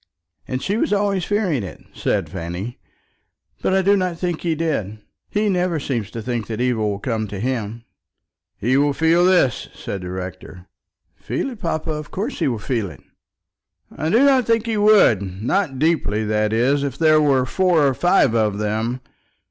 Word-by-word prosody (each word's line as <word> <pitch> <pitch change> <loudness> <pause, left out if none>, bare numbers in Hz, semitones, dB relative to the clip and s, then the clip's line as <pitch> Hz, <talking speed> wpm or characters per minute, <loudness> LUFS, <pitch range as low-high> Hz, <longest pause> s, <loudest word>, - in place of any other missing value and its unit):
"And 130 +1 -3
she 200 +3 0
was 225 - 0
always 200 -3 +1
fearing 195 - 0
it," 95 - -8
said - - -1
Fanny. 90 +8 -6 0.8
"But 190 - +1
I 190 - +3
do 200 +2 +4
not 185 -3 -1
think 175 -2 -2
he 165 -2 0
did. 140 - -2 0.3
He 210 +1 0
never 180 -4 +1
seems 120 -7 -3
to 115 +1 -7
think 120 -2 -3
that 110 -1 -4
evil 120 -4 +1
will 100 - -2
come 110 0 -2
to 100 -1 -6
him." 115 -1 -3 0.7
"He 125 +5 +1
will 145 0 +3
feel 165 +4 +3
this," 180 - +2
said 100 - -5
the 90 - -6
rector. 90 0 -7 0.5
"Feel 130 - -3
it, 235 - -10
papa! 165 -3 -2
Of 150 -1 -5
course 220 +9 -4
he - - +1
will 120 -4 -1
feel 110 -2 -2
it." 75 - -14 0.9
"I 155 - -2
do 235 +10 +4
not 265 -3 +4
think 230 -1 +2
he 225 -1 -1
would, 205 - +5
not 120 - -2
deeply, 135 -9 +1
that 105 0 0
is, 130 +6 +2
if 140 -2 -3
there 155 -1 +4
were 135 -4 +3
four 175 +1 +2
or 135 - +3
five 175 -5 +3
of 105 -3 +1
them. 110 +4 -2
135 Hz, 185 wpm, -21 LUFS, 110-180 Hz, 0.9 s, would